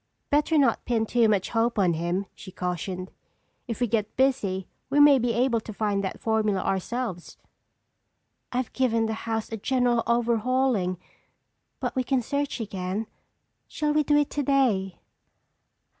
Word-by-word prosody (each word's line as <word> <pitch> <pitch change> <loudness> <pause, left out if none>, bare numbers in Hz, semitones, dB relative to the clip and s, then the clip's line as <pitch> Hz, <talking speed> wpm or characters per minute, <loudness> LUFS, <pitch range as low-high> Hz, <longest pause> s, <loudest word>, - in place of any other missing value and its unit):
"Better 300 +2 +3
not 280 -2 +3
pin 230 -2 0
too 230 0 +3
much 200 -3 +1
hope 235 0 +1
on 185 -4 +3
him," 175 +4 -1
she 185 - -11
cautioned. 180 +1 -4 0.6
"If 230 -3 -4
we 245 - +2
get 215 -2 -2
busy 210 -9 +1 0.2
we 285 +2 +2
may 290 -2 +7
be 240 0 +1
able 240 0 +2
to 220 - -9
find 205 -1 -1
that 190 - -4
formula 215 -3 +1
ourselves." 195 -1 -3 1.1
"I've 250 -1 -2
given 230 -3 +1
the 220 - -1 0.2
house 225 0 -2
a 225 - -3
general 245 +1 +1
overhauling 235 -4 +1 0.8
but - - -3
we 255 - +1
can 255 -1 0
search 280 +2 -2
again. 195 -1 -3 0.6
Shall 300 -1 -1
we 305 - +3
do 295 0 +3
it 295 -1 +1
today?" 255 -10 +1
230 Hz, 150 wpm, -26 LUFS, 195-260 Hz, 1.1 s, may